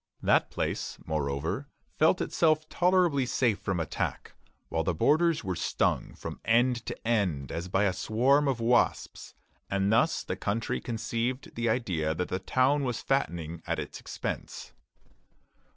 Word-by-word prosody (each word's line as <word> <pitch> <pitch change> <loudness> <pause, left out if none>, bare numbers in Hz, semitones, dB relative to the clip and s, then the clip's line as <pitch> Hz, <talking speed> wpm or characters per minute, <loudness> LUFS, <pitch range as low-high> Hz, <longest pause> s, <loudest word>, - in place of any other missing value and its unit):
That - - +3
place, - - -3
moreover, 80 - -2 0.3
felt 160 +4 +4
itself 155 -1 +2
tolerably 175 -7 +3
safe 120 -5 +1
from 95 -3 -2
attack, 80 - -3 0.3
while 80 - -1
the 85 +1 0
borders 160 - +3
were 95 -1 -2
stung - - 0
from - - -7
end 120 +1 +3
to - - -6
end 90 - 0
as 85 +2 -4
by 95 +2 +1
a 95 -3 +2
swarm 125 +9 +2
of 130 -3 0
wasps; 120 +1 +1 0.3
and 100 +1 +1
thus 140 +9 +2
the - - -3
country 105 +2 -2
conceived 115 +2 -3
the 120 0 -1
idea 85 -10 0
that 90 +2 -2
the 95 - -1
town 130 +8 +2
was 125 -3 -1
fattening 85 - -1
at - - 0
its - - -6
expense. - - -6
115 Hz, 150 wpm, -29 LUFS, 90-135 Hz, 0.3 s, felt